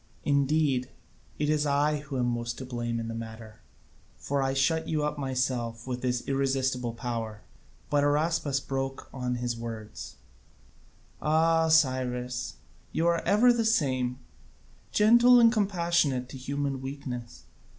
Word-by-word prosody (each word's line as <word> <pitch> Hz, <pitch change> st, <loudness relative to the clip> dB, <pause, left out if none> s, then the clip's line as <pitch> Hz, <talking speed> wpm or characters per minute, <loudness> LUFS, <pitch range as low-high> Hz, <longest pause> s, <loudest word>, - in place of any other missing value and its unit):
Indeed 140 Hz, -2 st, +2 dB, 0.5 s
it 150 Hz, -, 0 dB
is 150 Hz, -1 st, +1 dB
I 145 Hz, +2 st, +2 dB
who 140 Hz, -2 st, -6 dB
am 125 Hz, -, +1 dB
most 120 Hz, 0 st, -2 dB
to 130 Hz, -, -6 dB
blame 120 Hz, -2 st, -3 dB
in 115 Hz, -, -4 dB
the 115 Hz, -, -4 dB
matter, 110 Hz, -1 st, -8 dB, 0.6 s
for 140 Hz, 0 st, -1 dB
I 135 Hz, 0 st, 0 dB
shut 160 Hz, +4 st, +1 dB
you 155 Hz, -2 st, 0 dB
up 150 Hz, 0 st, -2 dB
myself 125 Hz, -4 st, -2 dB
with 125 Hz, -1 st, -4 dB
this 125 Hz, -1 st, -1 dB
irresistible 130 Hz, -3 st, 0 dB
power." 115 Hz, -3 st, -4 dB, 0.5 s
But 145 Hz, -1 st, +3 dB
Araspas 145 Hz, -1 st, +1 dB
broke 135 Hz, 0 st, -3 dB
in 135 Hz, -, -8 dB
on 125 Hz, 0 st, -1 dB
his 120 Hz, -1 st, -2 dB
words: 115 Hz, -2 st, -7 dB, 1.1 s
"Ah, 160 Hz, +1 st, +3 dB
Cyrus, 130 Hz, -5 st, +1 dB, 0.4 s
you 165 Hz, -, 0 dB
are 170 Hz, -1 st, +2 dB
ever 240 Hz, +4 st, +5 dB
the 235 Hz, -1 st, 0 dB
same, 130 Hz, -, +1 dB, 0.7 s
gentle 235 Hz, +3 st, +6 dB
and 230 Hz, -1 st, +7 dB
compassionate 170 Hz, -, +1 dB
to 135 Hz, -, -8 dB
human 140 Hz, 0 st, -3 dB
weaknesses. 125 Hz, -3 st, -7 dB
135 Hz, 140 wpm, -28 LUFS, 125-150 Hz, 1.1 s, and